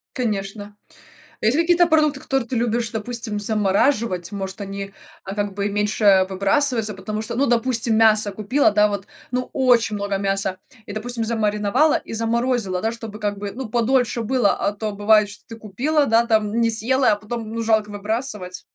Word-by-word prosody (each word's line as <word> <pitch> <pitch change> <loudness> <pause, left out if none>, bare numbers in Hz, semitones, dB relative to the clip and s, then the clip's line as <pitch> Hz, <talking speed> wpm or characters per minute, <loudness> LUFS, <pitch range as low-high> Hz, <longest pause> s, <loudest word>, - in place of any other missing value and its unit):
Конечно. 205 -3 -3 0.7
Есть 225 +5 +2
какие-то 345 +1 +4
продукты, 305 -3 +2
которые 270 -3 -2
ты 255 - -2
любишь, 235 0 0
допустим, 225 -1 -4
замораживать? 205 -2 0
Может 195 +1 -5
они, 195 0 -6 0.3
а 195 - -6
как 205 -1 -2
бы 200 0 -2
и - - -1
меньше 205 -2 +3
выбрасываются, 215 +3 +1
потому 210 +3 -5
что, 220 +1 -5
ну, 275 +3 +2
допустим, 235 -1 +1
мясо 215 -2 +4
купила, 215 +8 +2
да 210 0 +4
вот, 200 -1 -4 0.2
ну 250 0 -2
очень 245 -4 +3
много 200 -1 -2
мяса 195 -1 -1 0.3
и, - - -7
допустим, 230 +2 -3
замариновала 220 +5 +1
и - - -11
заморозила, 230 -4 0
да, 225 - +1
чтобы 225 -2 -8
как 205 -1 -2
бы 200 0 -5
ну 250 +2 -6
подольше 240 +1 +1
было. 235 -2 +2
А 200 - -1
то 210 +1 -4
бывает, 210 +1 +3
что 200 - -12
ты 225 - -9
купила, 260 +9 0
да, 230 +1 +3
там 220 0 +1
не 230 -1 +3
съела, 245 +2 +2
а - - +1
потом 215 +2 -6
ну 230 0 -3
жалко 220 -2 +1
выбрасывать. 205 -3 -4
220 Hz, 180 wpm, -21 LUFS, 205-240 Hz, 0.7 s, какие-то